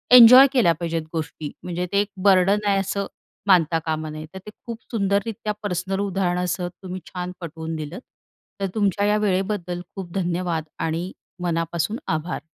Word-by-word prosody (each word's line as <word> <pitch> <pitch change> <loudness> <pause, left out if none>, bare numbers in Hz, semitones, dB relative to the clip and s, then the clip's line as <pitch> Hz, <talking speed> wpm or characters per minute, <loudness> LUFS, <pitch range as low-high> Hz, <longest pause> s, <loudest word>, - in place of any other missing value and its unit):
Enjoy 250 +3 +11
केल्या 215 -11 +4
पाहिजेत 165 -1 -1
गोष्टी, 155 -2 -4
म्हणजे 180 0 -3
ते 200 - +3
एक 205 - -2 0.2
बर्डन 195 +1 +5
आहे 200 -1 +3
असं 195 +1 -2 0.4
मानता 165 -4 +4
कामा 155 -1 -2
नये. 155 0 -7
तर 190 - -7
ते - - -7 0.2
खूप 230 -2 -6
सुंदररीत्या 210 0 0
पर्सनल 190 0 -2
उदाहरणासह 180 -2 -1
तुम्ही 185 +1 -8
छान 180 0 -5
पटवून 160 -1 -5
दिलंत, 155 +7 -6 0.6
तर 195 - +1
तुमच्या 205 -1 +1
या 210 - +3
वेळेबद्दल 190 -3 -1
खूप 185 -3 -6
धन्यवाद 175 -3 -1 0.2
आणि 165 +3 -2 0.3
मनापासून 170 +5 -1
आभार. 160 +2 -2
180 Hz, 155 wpm, -23 LUFS, 170-200 Hz, 0.6 s, Enjoy